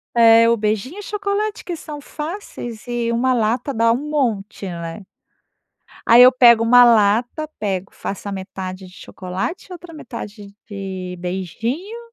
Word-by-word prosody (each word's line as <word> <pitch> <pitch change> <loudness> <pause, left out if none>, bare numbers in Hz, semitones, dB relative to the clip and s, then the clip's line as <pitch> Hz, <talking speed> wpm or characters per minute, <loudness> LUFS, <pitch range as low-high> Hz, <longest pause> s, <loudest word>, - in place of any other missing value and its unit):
É, 230 0 +6
o 235 - +3
beijinho 220 - -2
e - - -6
chocolate 415 +1 -3
que 350 - -4
são 300 -2 -8
fáceis 300 - -7
e 235 -1 -1
uma 255 +2 +1
lata 240 +3 0
dá 230 -1 +2
um 285 +6 -3
monte, 220 -9 -2
né. 170 +1 -7 1.0
Aí 235 +2 +8
eu 255 +1 +8
pego 235 -3 +6
uma 245 +1 +7
lata, 235 +6 +2
pego 195 -2 -3
faço 200 +1 -6
a - - -4
metade 190 -1 -7
de 180 - -16
chocolate 185 - -6
e - - -8
outra 350 -1 -10
metade 205 -8 -9
de 190 -3 -6
beijinho, 225 - -4
230 Hz, 155 wpm, -20 LUFS, 200-280 Hz, 1.0 s, Aí